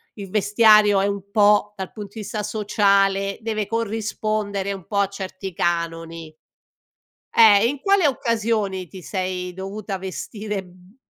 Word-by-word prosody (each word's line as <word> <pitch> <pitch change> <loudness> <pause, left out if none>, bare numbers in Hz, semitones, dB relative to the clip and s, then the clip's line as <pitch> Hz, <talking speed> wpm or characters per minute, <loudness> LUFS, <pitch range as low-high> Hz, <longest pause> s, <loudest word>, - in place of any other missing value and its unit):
il 200 -3 -8
vestiario 210 0 +5
è - - +1
un 200 -1 -3
po' 210 0 +4
dal 190 - -5
punto 205 -3 -8
di - - -6
vista 210 +1 -4
sociale 200 -2 +1
deve 215 -2 -2
corrispondere 215 -3 -2
un 190 -4 -9
po' 205 - -3
a 200 -1 +3
certi 190 -1 -7
canoni. 165 -1 -3 1.0
Eh, 215 -3 +7
e - - +4
in 280 +2 -3
quali 395 0 +3
occasioni 220 -7 0
ti 185 +1 -11
sei 185 -1 -4
dovuta 195 +1 -5
vestire, 205 +2 -5
mhmm, 180 +3 -20
200 Hz, 145 wpm, -22 LUFS, 190-215 Hz, 1.0 s, Eh